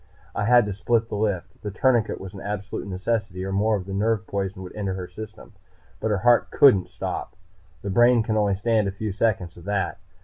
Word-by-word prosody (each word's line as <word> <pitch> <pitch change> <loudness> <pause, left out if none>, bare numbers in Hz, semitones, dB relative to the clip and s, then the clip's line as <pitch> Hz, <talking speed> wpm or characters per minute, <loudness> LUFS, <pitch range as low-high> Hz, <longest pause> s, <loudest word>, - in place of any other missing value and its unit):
I 105 - -1
had 120 0 +6
to 105 - -3
split 115 +3 0
the - - -3
lift. 95 -3 -2
The 105 - -4
tourniquet 115 +1 +1
was 95 -1 -8
an 95 - -9
absolute 100 0 -4
necessity, 95 -1 -2
or 95 - -3
more 105 +3 +2
of 95 -3 -4
the 95 - -6
nerve 105 +1 +1
poison 95 -1 -3
would 90 - -10
enter 100 -3 -2
her 90 -1 -5
system. 110 +2 -10 0.5
But 110 - -1
her 105 - +2
heart 120 -1 +5
couldn't 105 -10 +5
stop. - - -5 0.5
The 100 - -3
brain 120 +2 +5
can 110 0 -1
only 105 -2 +2
stand 110 +1 +1
a - - -1
few 105 +2 -4
seconds 95 -4 -1
of 85 - -13
that. 100 -4 -1
105 Hz, 215 wpm, -24 LUFS, 95-110 Hz, 0.5 s, had